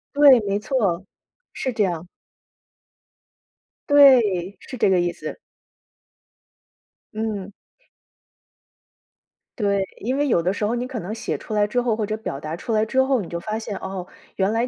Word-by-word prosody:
对， 280 Hz, -4 st, +8 dB
没 200 Hz, +1 st, +1 dB
错， 205 Hz, -6 st, -1 dB, 0.5 s
是 260 Hz, -2 st, -3 dB
这 215 Hz, -, +1 dB
样。 175 Hz, -2 st, -2 dB, 1.8 s
对， 220 Hz, -10 st, +5 dB
是 255 Hz, -, -9 dB
这 210 Hz, -, +3 dB
个 185 Hz, -2 st, +4 dB
意 175 Hz, 0 st, +1 dB
思。 -, -, -7 dB, 1.8 s
嗯。 210 Hz, -3 st, -3 dB, 2.1 s
对， 200 Hz, -2 st, +1 dB
因 255 Hz, +5 st, -1 dB
为 290 Hz, -, +1 dB
有 175 Hz, -10 st, +2 dB
的 180 Hz, -, +1 dB
时 205 Hz, +1 st, -2 dB
候 230 Hz, -, 0 dB
你 245 Hz, +1 st, -2 dB
可 255 Hz, -3 st, -5 dB
能 205 Hz, +5 st, -5 dB
写 -, -, -3 dB
出 215 Hz, -, -8 dB
来 205 Hz, 0 st, +3 dB
之 245 Hz, +4 st, 0 dB
后 235 Hz, -3 st, +1 dB
或 215 Hz, -1 st, -1 dB
者 215 Hz, +1 st, -3 dB
表 140 Hz, -10 st, -5 dB
达 155 Hz, +2 st, -5 dB
出 225 Hz, -, -4 dB
来 215 Hz, 0 st, +2 dB
之 265 Hz, +4 st, +2 dB
后， 265 Hz, -3 st, +2 dB
你 175 Hz, -, -7 dB
就 170 Hz, -, -4 dB
发 215 Hz, +5 st, -3 dB
现， 215 Hz, -3 st, -5 dB
哦， 190 Hz, -1 st, -5 dB, 0.3 s
原 195 Hz, +2 st, +1 dB
来 230 Hz, +2 st, 0 dB
215 Hz, 175 characters per minute, -23 LUFS, 190-245 Hz, 2.1 s, 对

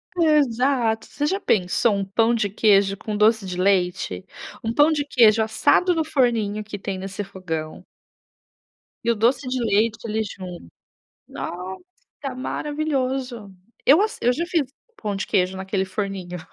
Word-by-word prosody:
Exato, 265 Hz, -7 st, +2 dB
você 290 Hz, -, -3 dB
já 385 Hz, +6 st, 0 dB
pensou 205 Hz, -, +2 dB
um 195 Hz, -1 st, -2 dB
pão 225 Hz, +4 st, +2 dB
de 215 Hz, -3 st, +1 dB
queijo 200 Hz, -1 st, +3 dB
com 210 Hz, +1 st, -4 dB
doce 215 Hz, 0 st, +3 dB
de 180 Hz, -1 st, -5 dB
leite? 180 Hz, -, 0 dB, 0.4 s
Um 225 Hz, -, -1 dB
pão 295 Hz, +5 st, +5 dB
de 295 Hz, -2 st, 0 dB
queijo 225 Hz, -5 st, +5 dB
assado 220 Hz, +11 st, +3 dB
no 325 Hz, -, +1 dB
forninho 230 Hz, -8 st, +1 dB
que 205 Hz, -1 st, -7 dB
tem 190 Hz, -1 st, -5 dB
nesse 195 Hz, +2 st, -5 dB
fogão 165 Hz, -5 st, -6 dB, 1.2 s
e 235 Hz, -, +2 dB
o -, -, 0 dB
doce 245 Hz, +6 st, +2 dB
de 255 Hz, -, -1 dB
leite 220 Hz, +1 st, +2 dB
ali 220 Hz, 0 st, -1 dB
junto. 180 Hz, -, -9 dB, 0.6 s
Nossa, 265 Hz, -, -8 dB
maravilhoso. 265 Hz, -6 st, -3 dB, 0.3 s
Eu 295 Hz, +7 st, +7 dB
asse 430 Hz, +1 st, 0 dB
eu 245 Hz, -, +4 dB
já 330 Hz, +7 st, -2 dB
fiz 325 Hz, -7 st, 0 dB, 0.3 s
pão 205 Hz, -, -3 dB
de 195 Hz, -, -3 dB
queijo 190 Hz, -2 st, +1 dB
naquele 190 Hz, 0 st, -2 dB
forninho. 190 Hz, -2 st, -4 dB
220 Hz, 150 wpm, -23 LUFS, 195-265 Hz, 1.2 s, Eu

